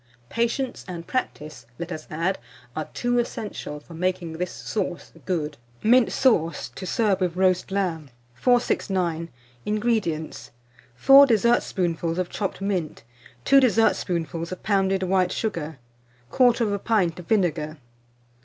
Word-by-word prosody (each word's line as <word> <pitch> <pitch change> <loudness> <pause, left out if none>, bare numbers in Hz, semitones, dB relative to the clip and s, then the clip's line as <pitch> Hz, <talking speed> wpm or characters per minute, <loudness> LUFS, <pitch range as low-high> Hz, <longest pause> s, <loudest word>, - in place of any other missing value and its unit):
Patience 235 +3 -1
and 170 -2 -6
practice, 155 - -4
let 170 +1 -6
us 155 -2 -6
add, 170 +5 -1 0.4
are 155 - -4
two 245 0 0
essentials 210 -10 -5
for 170 - -13
making 180 -1 -2
this 180 +2 -3
sauce 185 -5 -4 0.2
good. 155 -5 -2 0.3
MINT 245 +2 +5
SAUCE, 170 -11 +1
to 185 - -8
serve 205 -4 +1
with 180 -2 0
Roast 185 -1 +2
Lamb. 175 -7 -2 0.2
469. 180 - +1 0.4
INGREDIENTS. 210 -8 -1 0.5
4 275 - +8
dessertspoonfuls 185 -8 +1
of 185 -1 -1
chopped 195 -2 -3
mint, 185 - -2 0.4
2 275 - +7
dessertspoonfuls 175 -9 +1
of 185 - -7
pounded 195 -2 +1
white 185 -1 +2
sugar, 165 -10 -3 0.5
1/4 235 -5 +2
pint 185 -7 +1
of 175 - -10
vinegar. 160 -7 0
185 Hz, 125 wpm, -24 LUFS, 165-220 Hz, 0.5 s, 4